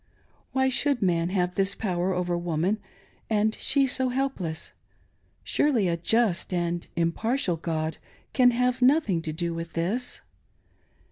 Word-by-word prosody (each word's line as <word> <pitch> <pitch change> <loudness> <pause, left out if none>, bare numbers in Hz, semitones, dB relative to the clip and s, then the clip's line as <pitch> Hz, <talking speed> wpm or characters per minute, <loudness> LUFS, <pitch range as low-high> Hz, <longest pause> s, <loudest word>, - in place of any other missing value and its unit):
Why 265 0 +2
should 265 -2 +1
man 170 -2 +1
have 180 -1 0
this 195 +1 +1
power 185 -3 -1
over 180 -1 -1
woman, 175 +4 0 0.5
and 220 0 +2
she 280 -1 +3
so 260 0 +1
helpless? 245 -12 -3 0.7
Surely 250 -10 +2
a 170 - +1
just 190 +1 +1
and 175 -1 -1
impartial 180 +5 0
God 160 -1 -3 0.3
can 250 -2 +6
have 250 +1 +1
nothing 250 - +3
to 160 - -4
do 170 +2 -2
with 165 0 -6
this 200 +10 -2
185 Hz, 135 wpm, -26 LUFS, 170-250 Hz, 0.7 s, can